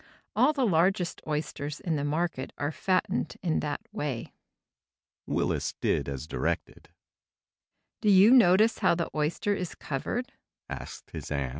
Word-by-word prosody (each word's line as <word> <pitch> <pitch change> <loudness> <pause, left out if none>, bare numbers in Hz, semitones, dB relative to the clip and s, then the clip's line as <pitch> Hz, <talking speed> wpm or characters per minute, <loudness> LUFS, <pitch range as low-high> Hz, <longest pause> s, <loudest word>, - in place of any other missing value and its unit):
All - - +5
the 275 -4 +1
largest 180 -1 +2
oysters 150 -1 -3
in 165 -3 -1
the 145 - -1
market 150 -2 -1
are 145 +1 -1
fattened 185 +3 0
in 165 -3 +1
that 145 -1 -3
way." 135 -6 -4 0.9
Willis - - -1
did - - 0
as 70 +1 -5
directed. - - -3 1.1
"Do 210 - +3
you 200 +3 +7
notice 220 -2 +6
how - - +4
the 170 -1 -2
oyster 155 +7 0
is 180 -4 -4
covered?" 195 - -3
165 Hz, 125 wpm, -28 LUFS, 145-195 Hz, 1.1 s, you